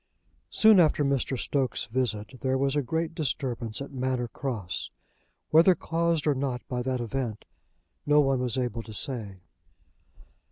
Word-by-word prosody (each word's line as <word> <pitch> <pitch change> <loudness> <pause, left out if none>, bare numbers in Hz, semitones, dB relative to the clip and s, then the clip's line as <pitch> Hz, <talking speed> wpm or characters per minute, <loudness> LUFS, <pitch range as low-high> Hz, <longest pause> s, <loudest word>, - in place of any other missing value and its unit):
Soon 215 -3 +6
after 155 -3 +4
Mr. 135 -1 0
Stokes' 130 0 -1
visit 115 0 -2
there 130 0 +1
was 135 +1 +1
a 145 - +2
great 160 +5 -2
disturbance 130 -7 -2
at 140 - -10
Manor 130 -2 -1
Cross, 110 - -4 0.6
whether 170 +4 +6
caused 165 -1 0
or 150 - +4
not 130 -2 -3
by 125 -1 -2
that 130 0 -1
event 120 -2 -3 0.6
no 150 0 +5
one 135 -3 +3
was 125 -1 -1
able 120 -2 -1
to 110 -1 -10
say. 105 -6 -4
130 Hz, 150 wpm, -27 LUFS, 120-145 Hz, 0.6 s, Soon